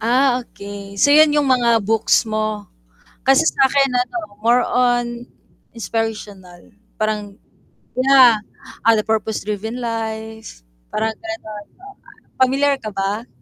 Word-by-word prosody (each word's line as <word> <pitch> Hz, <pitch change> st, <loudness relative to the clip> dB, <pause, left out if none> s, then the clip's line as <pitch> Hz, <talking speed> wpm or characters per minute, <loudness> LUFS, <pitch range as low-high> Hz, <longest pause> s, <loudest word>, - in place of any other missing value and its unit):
Ah, 250 Hz, +3 st, +2 dB
okey, 200 Hz, -3 st, -10 dB
so 285 Hz, +9 st, +4 dB
yun 305 Hz, 0 st, +6 dB
yung 295 Hz, -, +3 dB
mga 240 Hz, -4 st, +2 dB
books 225 Hz, +3 st, +2 dB
mo? 215 Hz, -1 st, -3 dB, 0.6 s
Kasi 270 Hz, +4 st, +5 dB
sa 270 Hz, -4 st, +3 dB
akin 275 Hz, -1 st, +2 dB
ano 250 Hz, +8 st, -1 dB, 0.3 s
more 240 Hz, +2 st, +3 dB
on, 240 Hz, -1 st, 0 dB, 0.5 s
inspirational 210 Hz, -5 st, -6 dB, 0.2 s
parang 210 Hz, -2 st, -3 dB, 0.6 s
yeah, 255 Hz, -3 st, +6 dB, 0.5 s
ah, 230 Hz, -, +5 dB
the 215 Hz, -, -1 dB
purpose 220 Hz, 0 st, -1 dB
driven 215 Hz, +3 st, -4 dB
life, 220 Hz, -, -6 dB, 0.3 s
parang 220 Hz, +1 st, -1 dB
ganun, 220 Hz, -12 st, -8 dB, 0.2 s
oo. 400 Hz, +1 st, -12 dB, 0.5 s
Pamilyar 275 Hz, +2 st, +3 dB
ka 215 Hz, -, -6 dB
ba? 200 Hz, +4 st, -3 dB
225 Hz, 125 wpm, -19 LUFS, 215-255 Hz, 0.6 s, yun